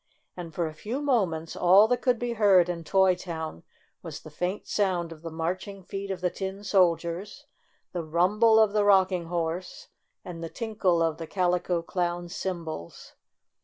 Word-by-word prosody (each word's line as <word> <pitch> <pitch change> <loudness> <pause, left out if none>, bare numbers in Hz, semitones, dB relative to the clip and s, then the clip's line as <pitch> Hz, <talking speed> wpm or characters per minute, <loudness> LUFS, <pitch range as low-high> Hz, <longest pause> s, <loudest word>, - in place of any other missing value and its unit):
And, 175 -2 -7
for 170 +1 -2
a 155 - -5
few 215 - -4
moments, 190 - 0
all 190 +4 +6
that 245 0 +1
could 250 -2 +2
be 240 0 -2
heard 195 -5 +5
in 170 -1 -4
Toy 190 +2 +4
Town 160 - -6 0.4
was - - -8
the - - -12
faint 180 +3 -3
sound 180 -5 0
of 160 -2 -11
the 165 - -6
marching 185 +5 -4
feet 195 +2 -6
of 190 -2 -4
the 180 -1 0
tin 195 +1 -5
soldiers, 180 0 0 0.5
the 175 -2 -3
rumble 205 +8 +3
of 215 -2 +4
the 210 -1 +3
Rocking 190 -3 +3
Horse 170 +1 -4 0.4
and 170 -2 -7
the 165 - -4
tinkle 195 -7 0
of 165 -1 0
the 165 - -6
Calico 180 -1 0
Clown's 175 0 -3
cymbals. 165 - -6
180 Hz, 170 wpm, -27 LUFS, 170-200 Hz, 0.5 s, all